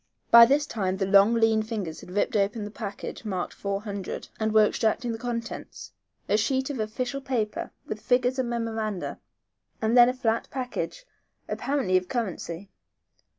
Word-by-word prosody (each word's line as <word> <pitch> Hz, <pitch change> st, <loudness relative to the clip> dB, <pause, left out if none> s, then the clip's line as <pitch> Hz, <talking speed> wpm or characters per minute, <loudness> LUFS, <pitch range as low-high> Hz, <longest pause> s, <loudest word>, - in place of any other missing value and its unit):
By 235 Hz, 0 st, +10 dB
this 285 Hz, +3 st, +3 dB
time 190 Hz, -7 st, -2 dB
the 195 Hz, -, 0 dB
long, 200 Hz, +4 st, +5 dB
lean 225 Hz, -1 st, +3 dB
fingers 210 Hz, -7 st, -4 dB
had -, -, -12 dB
ripped 205 Hz, +4 st, 0 dB
open 210 Hz, +2 st, +1 dB
the 205 Hz, -, -7 dB
package 205 Hz, 0 st, -6 dB
marked 190 Hz, -5 st, -3 dB
four 200 Hz, 0 st, -3 dB
hundred, 200 Hz, -3 st, -5 dB
and 220 Hz, 0 st, 0 dB
were 215 Hz, 0 st, +6 dB
extracting 230 Hz, +3 st, 0 dB
the 225 Hz, -, -5 dB
contents, 235 Hz, -1 st, -5 dB, 0.4 s
a 210 Hz, -, +3 dB
sheet 265 Hz, +5 st, 0 dB
of 265 Hz, -, -5 dB
official 245 Hz, +5 st, -3 dB
paper 240 Hz, -6 st, -2 dB, 0.2 s
with 215 Hz, -, -5 dB
figures 250 Hz, +1 st, +2 dB
and 250 Hz, -2 st, 0 dB
memoranda, 225 Hz, -4 st, -3 dB, 0.6 s
and 220 Hz, +2 st, +1 dB
then 240 Hz, 0 st, +8 dB
a -, -, 0 dB
flat 230 Hz, -3 st, 0 dB
package, 270 Hz, -, -4 dB, 0.4 s
apparently, 270 Hz, -10 st, +1 dB
of 185 Hz, 0 st, -2 dB
currency. 195 Hz, -5 st, -4 dB
225 Hz, 165 wpm, -26 LUFS, 205-245 Hz, 0.6 s, By